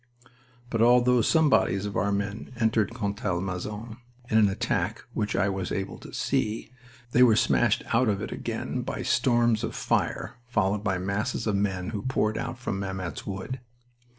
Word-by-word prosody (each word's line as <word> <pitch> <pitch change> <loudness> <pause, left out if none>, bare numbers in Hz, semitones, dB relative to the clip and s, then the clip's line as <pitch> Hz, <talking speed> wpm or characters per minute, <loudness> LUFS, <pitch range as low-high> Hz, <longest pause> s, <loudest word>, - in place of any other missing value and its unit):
But 115 - +1
although 125 +1 +5
some 160 +6 +4
bodies 100 -7 +2
of 100 - -4
our 100 0 +1
men 100 +4 -3
entered 110 -2 +2
Contalmaison, 105 0 -3 0.3
in 110 - +4
an 105 -2 +5
attack 95 - -1
which 105 -1 -1
I 100 - +2
was 95 -2 -2
able 95 -1 -3
to - - -11
see, 110 +2 -1 0.4
they 125 - +4
were 120 -4 +7
smashed 110 0 +3
out 115 0 +4
of 100 -2 0
it 105 - -5
again - - -3
by - - -4
storms 120 -2 +2
of - - -3
fire - - -1
followed 105 -4 +1
by 95 -3 0
masses 100 +7 -2
of 105 -3 +1
men 95 -1 -1
who 105 -3 -3
poured 110 -3 0
out - - -4
from 100 -5 -3
Mametz 95 -5 -4
Wood. 100 +7 -4
105 Hz, 170 wpm, -27 LUFS, 100-115 Hz, 0.4 s, were